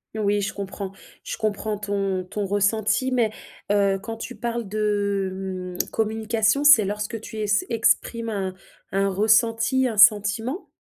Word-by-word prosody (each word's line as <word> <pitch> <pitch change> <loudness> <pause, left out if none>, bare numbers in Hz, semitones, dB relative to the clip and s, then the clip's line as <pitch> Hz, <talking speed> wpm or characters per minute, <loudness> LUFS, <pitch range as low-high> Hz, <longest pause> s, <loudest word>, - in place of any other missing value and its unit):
Oui 205 -1 +1
je 195 - -3
comprends, 195 -1 -5 0.3
je - - -5
comprends 215 -1 -2
ton 200 -2 -2
ton 200 +2 -4
ressenti 215 +5 +1
mais 240 -3 +2 0.4
heu, 200 -1 +2
quand 225 +2 -6
tu 230 +2 -7
parles 235 -2 -3
de 195 -3 -2
mmh, - - -14
communication, 220 +3 0
c'est 285 -7 +8
lorsque 210 +2 -4
tu 220 - -9
es 215 - -2
s 205 0 +2
exprimes 230 0 +1
un 190 -3 -3 0.4
un 195 +1 +1
ressenti, 225 +5 +2
un 225 -3 -4
sentiment? 210 - +3
210 Hz, 150 wpm, -24 LUFS, 200-225 Hz, 0.4 s, c'est